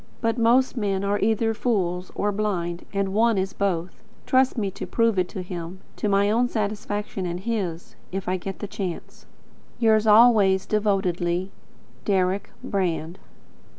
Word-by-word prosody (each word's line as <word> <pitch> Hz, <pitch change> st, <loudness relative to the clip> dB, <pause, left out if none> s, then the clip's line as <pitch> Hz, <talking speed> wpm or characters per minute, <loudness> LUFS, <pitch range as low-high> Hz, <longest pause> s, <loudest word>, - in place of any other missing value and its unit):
But 230 Hz, +1 st, 0 dB
most 245 Hz, +4 st, +3 dB
men 200 Hz, -4 st, -1 dB
are 200 Hz, +1 st, 0 dB
either 225 Hz, +1 st, +1 dB
fools 185 Hz, -6 st, -1 dB
or 205 Hz, -, 0 dB
blind, 180 Hz, -5 st, -2 dB
and 195 Hz, -1 st, -1 dB
one 225 Hz, 0 st, +3 dB
is 190 Hz, 0 st, -1 dB
both. 185 Hz, -3 st, -2 dB, 0.2 s
Trust 260 Hz, 0 st, +3 dB
me 200 Hz, -4 st, -1 dB
to -, -, -7 dB
prove 230 Hz, -4 st, +2 dB
it 180 Hz, -, 0 dB
to 185 Hz, -, -5 dB
him, 180 Hz, 0 st, -7 dB, 0.2 s
to 210 Hz, -, -1 dB
my 200 Hz, +1 st, +3 dB
own 240 Hz, +3 st, +3 dB
satisfaction 205 Hz, -3 st, -3 dB
and 175 Hz, 0 st, -3 dB
his, 190 Hz, -7 st, -3 dB, 0.2 s
if 195 Hz, 0 st, -4 dB
I 185 Hz, -, +1 dB
get 195 Hz, +1 st, -6 dB
the 205 Hz, -, -5 dB
chance. 195 Hz, -4 st, -6 dB, 0.5 s
Yours 220 Hz, -2 st, +3 dB
always 210 Hz, -4 st, +6 dB
devotedly, 190 Hz, -3 st, 0 dB, 0.5 s
Deryck 190 Hz, -1 st, 0 dB
Brand. 175 Hz, -3 st, -2 dB
200 Hz, 150 wpm, -24 LUFS, 185-220 Hz, 0.5 s, always